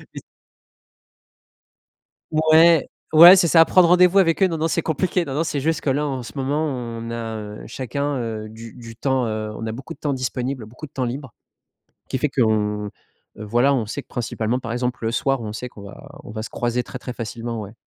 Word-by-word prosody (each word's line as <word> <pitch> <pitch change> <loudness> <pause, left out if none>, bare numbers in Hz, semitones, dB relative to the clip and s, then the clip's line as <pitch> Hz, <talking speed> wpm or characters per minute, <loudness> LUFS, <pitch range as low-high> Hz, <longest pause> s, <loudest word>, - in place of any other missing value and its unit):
c - - -6 2.1
Ouais, 160 0 +5 0.2
ouais, 170 +4 +10
c'est 175 -3 +3
ça, 165 0 +7
prendre 180 +1 +5
rendez-vous 180 +2 +5
avec 165 0 +3
eux, 190 - +7
non, 165 -3 -2
non, 160 +1 0
c'est 165 - 0
compliqué. 175 +2 0
Non, 135 -3 -5
non, 160 +3 0
c'est 145 -3 -2
juste 160 +2 -1
que 140 - 0
là, 145 +3 0
en 130 -3 -3
ce - - -10
moment, 140 +3 -1
on 115 -4 -5
a, 115 -1 -4
heu, 105 0 -8
chacun, 140 +4 -3
heu, 110 -2 -4
du 115 +1 -11
du 115 -2 -11
temps, 130 -2 0
heu, 110 -1 -3
on 110 - -6
a 110 - -3
beaucoup 130 +4 -8
de - - -14
temps 145 -2 -1
disponible, 130 -1 -3
beaucoup 125 +8 -10
de 140 - -23
temps 130 -3 -2
libre 125 0 -5 0.7
qui 130 - -2
fait 150 - 0
qu'on, 105 -5 0 0.5
voilà, 120 +6 +1
on 115 -5 -1
sait 140 +6 -5
que - - -40
principalement, 115 0 -2
par 115 -2 -6
exemple, 125 -1 -3
le 115 - 0
soir, 135 +1 0
on 110 -2 -5
sait 125 +3 -5
qu'on 105 -4 -13
va 100 - -12
on - - -10
va 110 0 -5
se - - -7
croiser 120 +1 -1
très 125 - -8
très 125 - -6
facilement, 115 0 -5
ouais. 100 +1 -9
125 Hz, 220 wpm, -22 LUFS, 115-150 Hz, 2.1 s, ouais